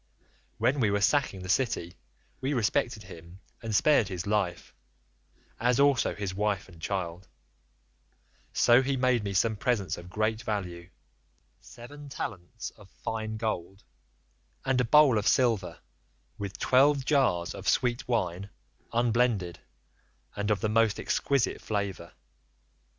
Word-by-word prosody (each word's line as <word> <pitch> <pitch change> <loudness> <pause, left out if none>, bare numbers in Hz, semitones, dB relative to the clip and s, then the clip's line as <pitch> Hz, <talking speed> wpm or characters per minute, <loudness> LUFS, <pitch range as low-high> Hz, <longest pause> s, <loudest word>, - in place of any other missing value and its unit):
When 130 +6 +1
we 110 -5 +3
were 100 0 +1
sacking 100 -4 +1
the - - -7
city 95 -5 0 0.5
we 135 +2 -1
respected 115 -1 0
him, 85 -1 -12 0.2
and 110 -2 -3
spared 145 -4 +4
his 90 -3 -5
life, 100 -4 -1 0.9
as 120 +2 +2
also 140 -2 +3
his 100 -2 -4
wife 105 0 -1
and 85 -4 -16
child; 90 -1 -3 1.2
so 120 +2 +5
he 135 +1 -1
made 125 -3 +2
me 100 -1 -3
some 110 +3 +2
presents 105 -5 -1
of 85 +1 -11
great 110 +3 -1
value—seven 110 +7 -9
talents 110 -2 -6
of 105 -3 -18
fine 110 +2 -4
gold, 100 -3 -4 0.8
and 130 -1 +2
a - - 0
bowl 135 -2 +6
of 105 - -2
silver, 115 -8 +2 0.6
with 100 -2 -5
twelve 135 +1 +3
jars 130 - +2
of - - -2
sweet 120 0 +1
wine, 100 -5 -1 0.4
unblended, 115 -6 +1 0.8
and 105 0 -2
of 105 -3 +1
the - - +1
most 110 -1 +2
exquisite 140 -4 0
flavour. 100 -4 -3
110 Hz, 130 wpm, -28 LUFS, 95-125 Hz, 1.2 s, bowl